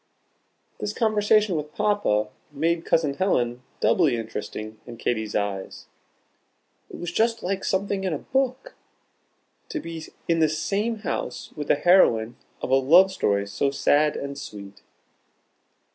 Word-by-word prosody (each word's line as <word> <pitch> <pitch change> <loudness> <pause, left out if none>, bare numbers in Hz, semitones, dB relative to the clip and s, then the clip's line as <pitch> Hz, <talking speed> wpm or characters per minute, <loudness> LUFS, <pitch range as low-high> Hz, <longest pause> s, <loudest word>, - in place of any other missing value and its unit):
This 210 - -3
conversation 215 -3 +2
with 150 -1 -5
Papa 205 - +1 0.2
made 165 +3 0
Cousin 155 -4 +2
Helen 125 -9 0 0.2
doubly 155 -9 +3
interesting 110 -1 -6
in 120 -1 -9
Katy's 110 -2 -2
eyes. 100 -2 -3 1.0
"It - - -9
was 175 0 -5
just 230 +4 +1
like 190 +1 -2
something 195 0 -1
in 190 - 0
a 155 - -1
book," 265 - -2 1.0
to 320 - -3
be 165 - -7 0.2
in 165 -1 +2
the 160 -1 +4
same 205 +8 -1
house - - -4
with 150 -1 -5
the - - +4
heroine 125 -9 +4 0.3
of - - -2
a - - +6
love 170 +9 +6
story 100 - 0
so 140 +7 0
sad 145 +2 +2
and 140 0 -5
sweet. 100 -6 -10
155 Hz, 140 wpm, -25 LUFS, 120-195 Hz, 1.0 s, a